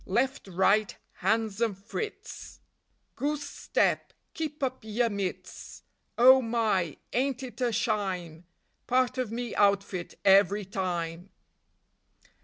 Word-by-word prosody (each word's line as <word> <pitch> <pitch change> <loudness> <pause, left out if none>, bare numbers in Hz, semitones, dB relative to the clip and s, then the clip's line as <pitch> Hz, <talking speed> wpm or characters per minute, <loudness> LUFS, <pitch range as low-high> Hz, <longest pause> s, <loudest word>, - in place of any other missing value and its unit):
Left, 260 +4 0
right, 195 +3 +2 0.2
Hans 220 +2 0
and 220 -5 +1
Fritz! 405 - -7 0.6
Goose 290 0 -2
step, - - 0 0.2
keep 305 -2 -4
up 260 -1 -1
yer 225 +2 0
mits! 200 -3 -5 0.3
Oh 260 +2 +8
my, 220 - 0 0.2
Ain't 265 +1 0
it 245 -2 -8
a 245 -1 +2
shyme! 185 -7 -2 0.4
Part 255 0 +2
of 245 -4 -2
me 240 0 -4
outfit 195 -3 +1
every 200 +1 +5
time. 180 -2 -3
215 Hz, 110 wpm, -28 LUFS, 190-255 Hz, 0.6 s, Oh